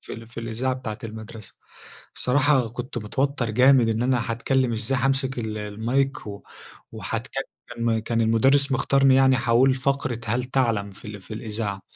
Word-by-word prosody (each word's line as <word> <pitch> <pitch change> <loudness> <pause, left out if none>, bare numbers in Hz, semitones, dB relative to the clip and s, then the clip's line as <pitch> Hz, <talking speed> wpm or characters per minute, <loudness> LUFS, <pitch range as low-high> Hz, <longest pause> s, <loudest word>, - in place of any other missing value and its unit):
في - - -10
ال 115 +1 -8
في 115 - -8
الإذاعة 115 +3 -2
بتاعة 110 -4 -6
المدرسة. 110 0 -8 0.6
الصراحة 135 -2 +2
كنت 120 +1 -6
متوتر 130 +3 -1
جامد 125 +1 +5
إن 110 +1 0
أنا 125 -2 0
هاتكلم 125 +2 0
إزاي، 115 +4 -1
هامسك 135 0 +1
ال 110 -2 -3
المايك، 115 +7 -1 0.7
وهاتكلم، 115 +1 -4
كان 115 -1 0
المدرس 135 +5 +3
مختارني 135 0 +3
يعني، 130 -1 +5
هاقول 125 +2 +3
فقرة 130 -3 -1
هل 120 +4 0
تعلم، 115 -6 0
في 100 - -16
ال 105 -1 -8
في 95 +3 -9
الإذاعة. 105 -2 -4
120 Hz, 150 wpm, -24 LUFS, 110-130 Hz, 0.7 s, جامد